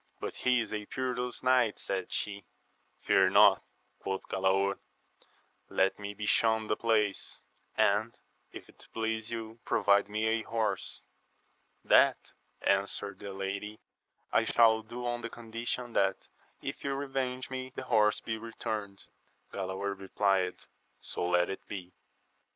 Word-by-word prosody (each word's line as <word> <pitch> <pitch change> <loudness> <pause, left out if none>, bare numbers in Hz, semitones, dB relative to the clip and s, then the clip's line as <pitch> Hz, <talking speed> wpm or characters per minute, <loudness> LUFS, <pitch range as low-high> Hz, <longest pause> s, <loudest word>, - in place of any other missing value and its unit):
But - - -5
he 125 -1 +3
is 110 -1 -5
a 105 -1 -4
perilous 125 -1 -3
knight, 125 -4 +3
said 95 -2 -3
she. 100 -1 -3 0.6
Fear - - +5
not, - - +7 0.4
quoth 95 0 -3
Galaor, 95 +1 +2 0.9
let 95 +1 +2
me 100 0 -5
be 105 - -4
shewn 110 0 +3
the 105 - 0
place; 105 -3 0 0.4
and, 110 +3 +2 0.3
if - - -10
it - - -16
please 110 -1 -1
you, 115 0 -5
provide 100 0 +3
me 110 +1 -1
a 110 0 +2
horse. 110 -4 -2 0.8
That, - - +4 0.3
answered 100 0 0
the 100 - -6
lady, 100 +2 -4 0.5
I - - +5
shall 110 -1 +5
do 120 +3 -7
on 120 0 -1
the 115 - -4
condition 115 +1 -4
that 95 -1 +1 0.4
if - - -5
you 140 -1 -1
revenge 130 -2 -3
me, 130 0 -4
the - - -4
horse 110 -4 +3
be 110 -1 -3
returned. 105 -3 -5 0.5
Galaor 95 +1 -3
replied. 95 -1 +1 0.4
So 90 - -3
let 90 0 +3
it 95 - -6
be. 95 -3 -7
110 Hz, 140 wpm, -31 LUFS, 100-115 Hz, 0.9 s, not